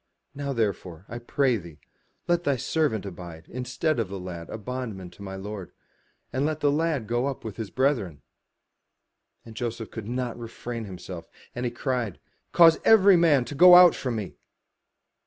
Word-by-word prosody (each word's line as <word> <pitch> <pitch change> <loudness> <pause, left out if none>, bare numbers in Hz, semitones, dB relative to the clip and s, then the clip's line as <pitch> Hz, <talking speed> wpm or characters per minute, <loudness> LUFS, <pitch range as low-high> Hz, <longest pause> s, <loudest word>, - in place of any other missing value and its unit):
Now 140 0 -4
therefore, 100 -7 -3
I 120 - -6
pray 125 +1 +1
thee, 85 -6 -11 0.5
let 175 0 +2
thy 140 -4 +1
servant 120 - -1
abide 85 -3 -9
instead 130 +4 -2
of 110 -5 -1
the 100 0 -6
lad 85 -2 -7
a - - -5
bondman 110 -5 -6
to - - -16
my 95 -1 -6
lord; 100 -1 -7 0.6
and 130 - 0
let 155 +1 -1
the 145 -2 +2
lad 155 -5 0
go 120 +4 0
up 140 - -5
with 110 -2 -6
his 110 -4 -5
brethren. 120 - -1 1.2
And 115 - -11
Joseph 115 -1 -4
could 110 -3 -7
not 125 0 -3
refrain 115 0 -6
himself, 90 -3 -9 0.2
and 120 +1 -4
he 120 - -1
cried, 120 -5 -3 0.3
''Cause 165 -1 +6
every 200 -3 +7
man 155 -7 +4
to - - -7
go 180 +5 +8
out 180 -1 +9
from 125 -3 -3
me.' 105 -4 -5
120 Hz, 175 wpm, -26 LUFS, 100-140 Hz, 1.2 s, out